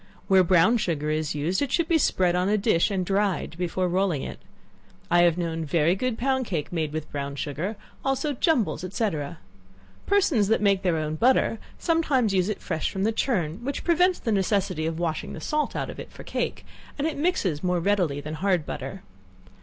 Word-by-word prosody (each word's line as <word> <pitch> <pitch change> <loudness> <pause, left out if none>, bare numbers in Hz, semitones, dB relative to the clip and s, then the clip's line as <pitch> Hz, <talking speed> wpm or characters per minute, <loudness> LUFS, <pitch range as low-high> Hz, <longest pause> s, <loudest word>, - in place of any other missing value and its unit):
Where 190 -1 +6
brown 185 +6 +4
sugar 155 -8 -1
is 155 -1 -1
used, 160 - 0
it 280 -2 -1
should 335 -2 +1
be 330 -1 +3
spread 180 -9 +2
on 180 +2 +1
a 210 - +3
dish 200 -4 +2
and 190 -3 -1
dried 195 -3 0
before 180 +1 -1
rolling 180 -5 0
it. - - -7 0.7
I 175 - +6
have 170 -1 +4
known 165 -2 -2
very 160 +3 +2
good 250 +2 -2
pound 260 0 0
cake 165 -3 -3
made 160 -3 -1
with 155 0 -5
brown 140 -1 -4
sugar; 155 +9 -3 0.3
also 270 +2 0
jumbles, 255 - +1
&c. 225 -2 +2 1.0
Persons 330 - +3
that 220 - +3
make 200 -2 +3
their 180 -4 +1
own 155 0 -2
butter 240 0 +3 0.2
sometimes 285 - +1
use 185 +1 +2
it 210 - -3
fresh 160 -4 -1
from 190 - -3
the 220 - +2
churn, 205 - -1
which 280 +2 -3
prevents 355 +2 +3
the 225 - -2
necessity 190 -5 0
of 165 0 -3
washing 165 -2 -2
the - - -7
salt 300 - -1
out - - -2
of - - -11
it - - -8
for - - -11
cake, - - -3 0.3
and 285 - -1
it 320 - -1
mixes 280 - 0
more 180 -1 +1
readily 175 -6 +1
than 155 +2 -6
hard 180 0 0
butter. 190 +3 -6
190 Hz, 200 wpm, -25 LUFS, 165-230 Hz, 1.0 s, Where